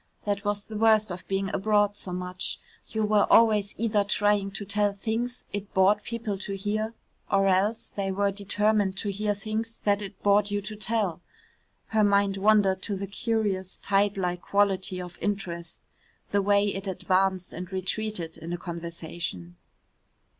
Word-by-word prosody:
That 200 -1 -1
was 205 0 -1
the 215 -1 -6
worst 215 -2 +4
of 180 0 -7
being 195 0 -1
abroad 205 0 +2
so 190 - -5
much, 180 +1 -4 0.3
you 220 -1 -1
were 210 -1 +3
always 215 -3 +5
either 215 -2 +2
trying 205 -1 +2
to 200 +1 -5
tell 205 0 +1
things 230 +4 -3
it 205 0 -4
bored 195 +2 +5
people 225 -3 -4
to 195 0 -4
hear, 215 +3 -2 0.4
or 195 0 +4
else 195 +4 +1
they 195 -1 -2
were 200 +1 +1
determined 205 0 +1
to 205 +1 -2
hear 205 +1 -1
things 220 +3 -3
that 205 0 +2
it 200 - -7
bored 205 0 +4
you 205 0 0
to 210 +2 -6
tell. 205 -5 -1 0.7
Her 220 -1 +3
mind 200 -1 +3
wandered 195 -2 +4
to 205 - -2
the 195 +1 -3
curious 200 -2 -1
tide 200 0 +1
like 180 -2 -1
quality 195 -2 +1
of 180 -1 -8
interest, 175 -5 -3 0.5
the 200 - +3
way 200 +1 +3
it 195 +1 -5
advanced 185 0 0
and 180 +2 -7
retreated 190 -2 -3
in 165 +2 -7
a 175 - -2
conversation. 170 - -6
200 Hz, 165 wpm, -27 LUFS, 190-210 Hz, 0.7 s, always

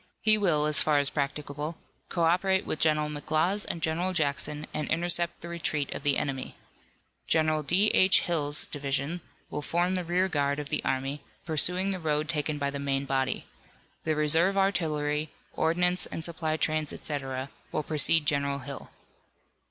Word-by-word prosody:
He 215 0 +6
will, 170 -8 +2
as 150 -1 +3
far 150 -1 +3
as 145 0 +2
practicable, 145 +2 -3 0.3
co 170 - -1
operate 190 +3 +2
with - - -2
General 150 -1 +2
McLaws 155 +6 0
and 165 - -4
General 175 +4 0
Jackson, 150 -1 -1
and 150 - -3
intercept 170 +1 +1
the 170 - -7
retreat 155 -4 -2
of - - -5
the 145 -1 +2
enemy. 135 -2 -3 0.7
General 155 -1 +2
D. 180 +9 +3
H. 185 0 +5
Hill's 150 -4 -1
division 140 +4 -2 0.3
will - - -3
form 175 +4 0
the 185 -1 0
rear 180 +2 +1
guard 140 -4 0
of 145 -1 -5
the 150 - -1
army, 135 +2 -2 0.2
pursuing 180 +4 +3
the 190 - -3
road 155 -2 0
taken 150 -1 -1
by 140 -1 -1
the 140 - -5
main 140 0 -1
body. 135 -1 -1 0.6
The 155 -1 0
reserve 160 +6 +3
artillery, 155 -6 0 0.2
ordinance 180 +3 +1
and 160 - -5
supply 160 -2 -2
trains, 155 -1 +1
etc., 135 -2 -4 0.2
will 155 - -1
precede 155 +1 +4
General 140 -1 0
Hill. 140 0 -8
155 Hz, 165 wpm, -28 LUFS, 145-170 Hz, 0.7 s, He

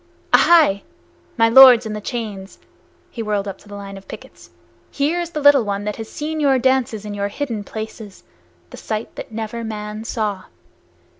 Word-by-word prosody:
Aihai! 310 -13 +5 0.6
my 225 -1 +4
lords 245 0 +8
in 215 - -4
the 210 - -5
chains," 205 -4 -6 0.5
he 230 - -6
whirled 205 -2 -2
up 195 -1 -7
the 205 -1 -12
line 200 -1 -8
of 195 - -14
pickets - - -12 0.4
"here 300 +5 -1
is 345 -1 -3
the 310 - -4
little 285 -3 +5
one 200 -1 -3
that 210 0 -4
has 220 -1 -7
seen 310 +1 -4
your 275 -3 +3
dances 250 -4 0
in 210 - -6
your 200 0 -2
hidden 230 -2 -4
places, 220 -1 -9 0.5
the - - -10
sight 215 0 -5
that - - -9
never 225 +1 -5
man 215 -1 -6
saw! 215 -4 -3
220 Hz, 175 wpm, -20 LUFS, 205-260 Hz, 0.6 s, lords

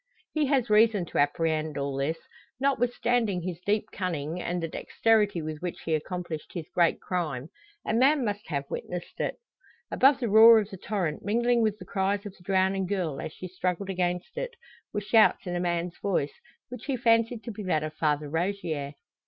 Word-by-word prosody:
He 305 -2 +1
has 265 -4 +2
reason 210 -3 +4
to - - -3
apprehend 155 +1 +1
all 140 -1 -2
this. 140 +4 -1 0.4
Notwithstanding 245 -7 +1
his 175 -2 -4
deep 210 +1 0
cunning, 170 -2 -3
and 175 +1 -2
the 165 - -2
dexterity 205 0 +1
with 155 -1 -5
which 180 -1 -4
he 165 - 0
accomplished 165 0 -4
his 170 -3 -4
great 170 -2 +3
crime, 155 -6 -3 0.4
a - - -1
man 265 +3 +4
must 205 0 -3
have 140 -4 -2
witnessed 175 +4 -6
it. - - -1 0.6
Above 270 0 +5
the 240 - -1
roar 225 +2 +9
of 210 -2 0
the 195 - -7
torrent, 185 -5 -2
mingling 235 +3 +2
with 215 -2 +1
the 185 - -10
cries 200 +2 -1
of 200 -2 -8
the 175 - -20
drowning 190 0 +1
girl 180 -7 -2
as - - -5
she 185 - -8
struggled 185 +2 -2
against 180 - -2
it, - - -4 0.4
were 210 - -2
shouts 215 +1 +4
in 175 -1 -3
a - - 0
man's 175 0 -2
voice, 160 -8 0 0.4
which 250 -1 -8
he 275 -3 -1
fancied 230 -1 +2
to 235 - -5
be 210 - -7
that 180 -6 0
of 155 0 -4
Father 150 -1 0
Rogier. 160 -3 -2
185 Hz, 190 wpm, -27 LUFS, 165-220 Hz, 0.6 s, roar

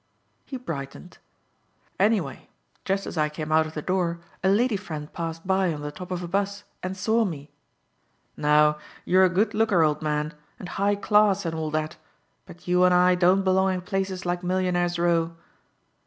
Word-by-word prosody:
He 265 - -5
brightened. 165 - -7 0.8
"Anyway 195 - 0 0.4
just 195 0 0
as 160 - -4
I 150 0 +2
came 155 0 -6
out 160 0 +4
of 155 - -11
the 150 - -4
door 175 -2 0 0.2
a 190 - +4
lady 225 +3 +3
friend 155 -7 -6
passed 165 0 -5
by 190 -1 +2
on 150 -2 -5
the 145 - -4
top 180 +4 -9
of 180 -1 -3
a - - -4
'bus 200 +2 -2 0.2
and 185 +1 -4
saw 220 +4 +2
me. 150 -7 -5 0.8
Now 150 0 +3 0.3
you're 185 +1 +5
a - - +3
good 195 +6 +1
looker, 210 -6 +3
old 150 0 +1
man, 150 0 -1 0.2
and 180 - -8
high 200 +1 +1
class 205 -1 +3
and 165 - -2
all 160 -1 -3
that, 155 0 -4 0.5
but 175 - -14
you 180 0 +3
and 180 0 +5
I 180 +1 +5
don't 180 +2 +3
belong 190 0 +2
in 180 - -4
places 190 0 -3
like 175 0 -1
Millionaires' 180 -1 0
Row." 170 -1 +1
180 Hz, 185 wpm, -25 LUFS, 160-190 Hz, 0.8 s, you're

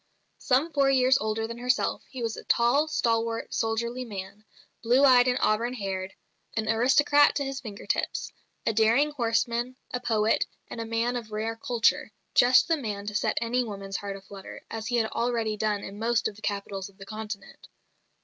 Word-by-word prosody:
Some 280 +6 +1
four 280 -1 +3
years 260 0 +4
older 220 +1 -1
than 235 +1 -7
herself, 250 +1 0
he 255 -3 -6
was 225 -1 -2
a - - -9
tall, 250 +6 +3
stalwart, 230 -5 -1
soldierly 235 +2 -1
man, 205 -1 -8 0.4
blue 250 +4 +4
eyed 250 -2 +6
and 250 0 +2
auburn 235 +4 +1
haired, 190 -3 -4 0.4
an 220 0 0
aristocrat 265 +6 +4
to 280 - -1
his 270 0 -4
finger 210 -6 -9
tips, - - -2 0.3
a 225 - +1
daring 230 +7 +3
horseman, 235 -1 0 0.2
a 250 - -1
poet, 220 -2 +1 0.2
and 230 - -5
a - - -4
man 230 +2 0
of 230 -3 -5
rare 220 +2 -2
culture 230 -1 +1 0.2
just 250 +1 +6
the 330 -1 +2
man 210 -7 -4
to 210 - -4
set 210 - 0
any 245 +2 +1
woman's 195 -3 -5
heart 200 -1 -5
a - - -13
flutter, 195 0 -11
as 225 0 -4
he 245 - 0
had 225 -2 +1
already 230 -2 -1
done 210 -1 -1
in 200 +1 -8
most 230 +1 +1
of 205 - -7
the 215 - -15
capitals 200 -2 -4
of 195 - -23
the 195 - -10
Continent. 215 -1 -8
230 Hz, 190 wpm, -27 LUFS, 215-250 Hz, 0.4 s, eyed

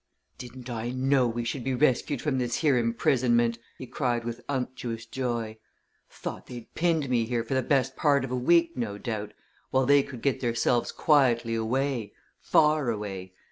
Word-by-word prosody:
"Didn't 125 0 -9
I 120 -1 -3
know 130 0 +2
we 120 +1 -2
should 120 +2 -3
be 130 0 -1
rescued 130 0 +1
from 140 -4 0
this 120 -1 -1
here 145 -2 +2
imprisonment!" 120 -1 +2 0.2
he 130 - -7
cried 120 -1 -1
with 120 +1 -5
unctuous 125 -4 -3
joy. 115 -3 -3 0.5
"Thought - - -7
they'd 120 -2 -10
pinned 165 -4 +1
me 120 -3 +1
here 120 0 -1
for 130 +3 0
best 135 0 +1
part 140 -3 +2
of 130 - -8
a - - 0
week, 170 +6 +3
no 110 -5 -3
doubt, 105 -2 -5 0.3
while 130 0 +2
they 145 +1 +6
could 130 -4 -9
get 135 -2 +1
theirselves 120 0 +1
quietly 125 -6 +3
away 115 -1 -1 0.3
far 150 -4 +3
away! 95 -4 -5
125 Hz, 170 wpm, -27 LUFS, 115-135 Hz, 0.5 s, they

